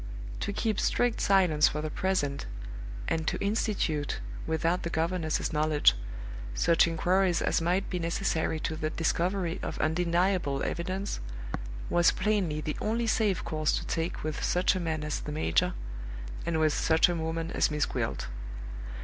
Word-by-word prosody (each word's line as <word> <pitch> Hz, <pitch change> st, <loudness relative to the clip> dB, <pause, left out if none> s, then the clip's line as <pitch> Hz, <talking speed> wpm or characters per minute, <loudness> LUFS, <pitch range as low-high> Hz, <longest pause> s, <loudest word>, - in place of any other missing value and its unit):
To -, -, -2 dB
keep 215 Hz, 0 st, 0 dB
strict 245 Hz, -2 st, +1 dB
silence 180 Hz, -6 st, +5 dB
for 150 Hz, -, -2 dB
the 155 Hz, 0 st, -3 dB
present, 145 Hz, -, 0 dB, 0.6 s
and 160 Hz, -1 st, -1 dB
to -, -, +1 dB
institute 200 Hz, -, 0 dB, 0.3 s
(without 165 Hz, +3 st, +1 dB
the 170 Hz, -, -3 dB
governess's 165 Hz, -1 st, 0 dB
knowledge) 150 Hz, -1 st, +4 dB, 0.6 s
such 165 Hz, -, +4 dB
inquiries 180 Hz, +2 st, +2 dB
as -, -, +1 dB
might 180 Hz, +4 st, +1 dB
be 180 Hz, -, -2 dB
necessary 165 Hz, -1 st, 0 dB
to 160 Hz, -, -2 dB
the 155 Hz, 0 st, -1 dB
discovery 175 Hz, +2 st, 0 dB
of -, -, -4 dB
undeniable 170 Hz, -2 st, +1 dB
evidence, 185 Hz, +4 st, -2 dB, 0.7 s
was 175 Hz, 0 st, +5 dB
plainly 185 Hz, -7 st, 0 dB
the 150 Hz, -, -3 dB
only 230 Hz, +2 st, 0 dB
safe 215 Hz, -4 st, +2 dB
course 155 Hz, -1 st, 0 dB
to -, -, -1 dB
take 165 Hz, +1 st, -2 dB
with 155 Hz, 0 st, -3 dB
such 180 Hz, +1 st, +3 dB
a -, -, 0 dB
man 160 Hz, -3 st, -2 dB
as 150 Hz, 0 st, -2 dB
the 150 Hz, -, -6 dB
major, 85 Hz, -, +1 dB, 0.7 s
and 165 Hz, -2 st, +1 dB
with 155 Hz, -1 st, +3 dB
such 160 Hz, 0 st, +4 dB
a 175 Hz, -, 0 dB
woman 165 Hz, 0 st, -2 dB
as -, -, +2 dB
Miss 150 Hz, -1 st, +1 dB
Gwilt. -, -, -2 dB
165 Hz, 155 wpm, -29 LUFS, 155-185 Hz, 0.7 s, silence